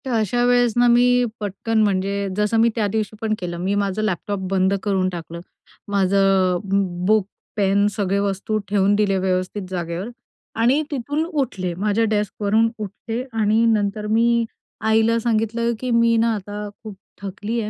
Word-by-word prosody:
तर 260 - -3
अशा 225 +3 +1
वेळेस 245 -2 +3
ना, 245 0 +5
मी 245 +1 +4
पटकन 215 +2 -1
म्हणजे 200 0 0
जसं 210 +2 +1
मी 230 +1 +5
त्या 215 -3 +1
दिवशी 215 -1 -2
पण 220 -1 0
केलं 175 -1 -4
मी 190 +3 -1
माझा 200 +1 -2
लॅपटॉप 205 0 -2
बंद 190 0 +2
करून 190 -3 +1
टाकला, 170 -1 -7 0.5
माझं 195 -2 +2
बु 195 +1 +3 0.3
बुक, 215 0 +3 0.3
पेन, 200 0 +3
सगळ्या 200 -1 0
वस्तू 200 +2 -1
ठेवून 200 0 +3
दिल्या 200 -2 +1
व्यवस्थित 185 +2 -1
जागेवर 175 +2 -4 0.5
आणि 255 +6 +3
तिथून 290 +3 -2
उठले. 260 - -2
माझ्या 210 +4 0
डेस्कवरून 210 +2 +1
उठले 225 +4 -5
आणि 220 +1 +2
नंतर 210 -1 0
मी 235 +1 +3 0.4
आईला 225 +1 +3
सांगितलं 230 +1 0
की, 255 - -4
"मी 230 0 +4
ना 230 0 +2
आता 205 +1 -6 0.2
खूप 215 -3 -8 0.3
थकले 205 +4 -3
आहे, 210 - -4
210 Hz, 160 wpm, -21 LUFS, 195-230 Hz, 0.5 s, ना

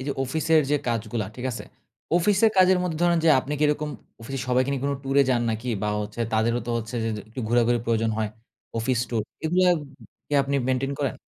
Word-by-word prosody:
এইযে 140 +2 -2
অফিসের 160 +4 +2
যে 150 - +4
কাজগুলা 115 -1 -2
ঠিক 125 - -6
আছে? 115 - -5 0.5
অফিসের 205 +5 +4
কাজের 185 0 +6
মধ্যে 170 -4 -2
ধরেন 175 -1 +4
যে - - +5
আপনি 140 - -6
কি - - -1
এরকম 150 0 0 0.3
অফিসে 135 +4 -5
সবাইকে 125 +1 +2
নিয়ে 135 -2 -3
কোন 140 - +1
ট্যুরে 135 +1 +4
যান 120 -2 +2
নাকি? 110 +3 -4
বা 105 - 0
হচ্ছে 105 +2 -6
তাদেরও 115 +2 +1
তো - - -2
হচ্ছে 115 +2 -7
যে - - 0
যে - - -5
একটু 115 +4 -7
ঘোরাঘুরির 120 0 +2
প্রয়োজন 115 -1 +1
হয়। 110 -1 0 0.5
অফিস 120 +2 0
ট্যুর 115 -3 -1 0.2
এগুলা 180 +3 +3 0.6
কি - - -12
আপনি 140 +1 -2
মেইনটেইন 130 +2 0
করেন? 140 -3 -1
130 Hz, 210 wpm, -25 LUFS, 115-150 Hz, 0.6 s, কাজের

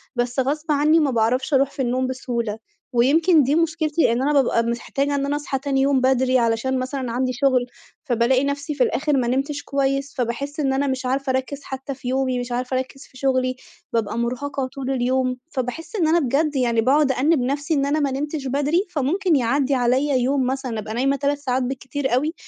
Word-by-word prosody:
بس 245 +1 -1
غصب 300 +4 -1
عنّي 300 +3 +4
ما 290 -3 +2
باعرفش 245 +5 +1
أروح 275 +1 +3
في 270 - -5
النوم 255 +1 0
بسهولة. 235 -4 -3 0.4
ويمكن 305 +7 +4
دي 275 +4 +1
مشكلتي 325 -3 +1
إن 235 +2 0
أنا 295 +2 +1
بابقى 245 -4 +3
محتاجة 275 +4 -1
إن 280 0 0
أنا 285 +1 -1
أصحى 285 -2 -3
تاني 270 -1 0
يوم 275 -1 +3
بدري، 260 0 +3
علشان 235 +3 0
مثلًا 255 -1 -3
عندي 255 +1 -1
شُغل، 260 -1 +2 0.4
فبالاقي 255 0 +2
نفسي 285 +2 -2
في 260 - +3
الآخر 285 +3 +1
ما 245 -2 +1
نمتش 280 +3 -1
كويس، 275 +1 -1
فباحِسّ 275 +5 -3
إن 270 -2 +1
أنا 280 +1 0
مش 260 0 -2
عارفة 270 +2 -1
أركِّز 260 +2 -3
حتى 265 +1 -6
في 255 - -9
يومي، 260 -1 0
مش 245 0 -5
عارفة 250 +1 -1
أركِّز 260 +1 -5
في 260 - -17
شُغلي، 255 -1 +1 0.4
بابقى 225 -1 -1
مُرهَقة 260 +3 -2
طول 270 0 -5
اليوم، 255 0 0
فباحِسّ 265 - -4
إن 340 -6 +2
أنا 335 +2 +4
بجد 290 +2 0
يعني 235 -3 +2
باقعد 275 +3 +3
أأنّب 290 +4 +2
نفسي 285 +5 -1
إن 275 -2 +1
أنا 290 +2 +1
ما 285 -2 0
نمتش 290 +1 -3
بدري، 290 +8 +1
فممكن 340 +3 +1
يعدّي 275 +2 +1
عليّا 260 +3 +2
يوم 260 +1 +1
مثلًا 260 -3 -2
أبقى 215 +1 -6
نايمة 270 +4 +1
3 285 +1 -1
ساعات 260 -2 -1
بالكتير 265 +1 -3
أوي، 300 +6 0
270 Hz, 200 wpm, -22 LUFS, 255-285 Hz, 0.4 s, عنّي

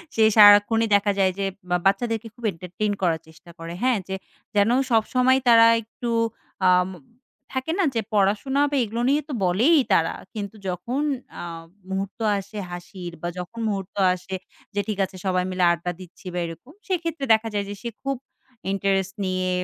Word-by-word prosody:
সে 220 - +4
সারাক্ষণই 210 +2 +7
দেখা 205 0 +3
যায় 190 -1 +4
যে 195 - 0 0.4
বাচ্চাদেরকে 225 +3 +1
খুব 240 - -17
এন্টারটেইন 185 +5 -3
করার 165 -3 +2
চেষ্টা 160 +2 -17
করে 165 +1 -6
হ্যা, 255 0 +4
যে 190 - -3 0.4
যেন 205 +1 +4 0.2
সবসময় 255 +3 +3
তারা 230 -1 +8 0.2
একটু 235 +2 -7 0.6
আম 180 0 +4 0.6
থাকে 260 +4 -2
না - - +4
যে 225 - +2
পড়াশোনা 210 +8 +2
বা - - 0
এগুলো 230 +2 -3
নিয়ে 295 +2 +3
তো - - -3
বলেই 235 - +4 0.2
তারা 165 -3 +3 0.2
কিন্তু 210 0 -5
যখন 210 - -2 0.4
আ - - -5 0.5
মুহূর্ত 195 +2 -4 0.2
আসে 200 +2 -9
হাসির 175 0 -7
বা 175 - -2
যখন 225 +6 -7
মুহূর্ত 195 -2 -4 0.2
আসে 190 +1 -7 0.4
যে 205 - +2
ঠিক 215 - -2
আছে 190 - -14
সবাই 185 -1 +1
মিলে 185 -1 0
আড্ডা 170 +1 -2
দিচ্ছি 180 +1 -14
বা 180 - -1
এরকম, 165 - -9 0.2
সেক্ষেত্রে 335 -6 -2
দেখা 220 +1 +1
যায় 205 -1 -1
যে 205 - -5
সে 235 - -3
খুব 275 -1 -1 0.5
ইন্টারেস্ট 195 -1 0
নিয়ে 185 0 -1
205 Hz, 170 wpm, -24 LUFS, 185-230 Hz, 0.6 s, তারা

